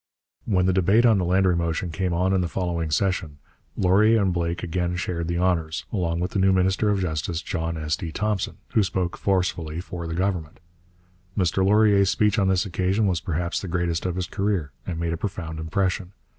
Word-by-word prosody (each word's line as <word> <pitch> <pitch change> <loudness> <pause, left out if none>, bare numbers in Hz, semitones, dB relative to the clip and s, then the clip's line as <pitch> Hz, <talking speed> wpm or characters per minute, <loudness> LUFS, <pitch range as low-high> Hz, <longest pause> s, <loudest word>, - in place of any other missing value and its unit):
When 90 -4 +2
the 95 - +2
debate 95 +6 +4
on 110 -4 +5
the 90 - 0
Landry 90 0 +3
motion 85 +1 -1
came 90 +2 -1
on 90 +3 +1
in 95 - +2
the 90 - -1
following 85 -2 -2
session, 80 -2 -1 0.4
Laurier 105 +5 +4
and 95 -3 +1
Blake 85 0 -2
again 90 0 -1
shared 85 -2 -3
the 85 0 -1
honours, 85 -3 0
along 85 -4 0
with 90 - -2
the 100 - -1
new 95 0 +4
minister 95 +3 +2
of 100 -1 +1
Justice, 80 -1 -2
John 85 -2 -3
S. 75 0 -1
D. 85 -1 -6
Thompson, 105 +1 -2
who 110 - +2
spoke 90 -2 -1
forcefully 90 -4 -1
for 90 -2 -6
the 80 - -4
Government. 90 -4 -2 0.8
Mr 95 0 +2
Laurier's 100 -1 +4
speech 105 +1 +2
on 95 - +2
this 95 0 +2
occasion 95 +3 0
was 90 -4 +1
perhaps 85 +1 -2
the 95 - -6
greatest 85 0 -1
of 90 - -2
his 90 -1 -2
career, 95 -7 -1 0.2
and 85 -3 -3
made 85 0 -1
a - - -3
profound 85 -5 -5
impression. 90 +3 -1
90 Hz, 200 wpm, -24 LUFS, 85-95 Hz, 0.8 s, on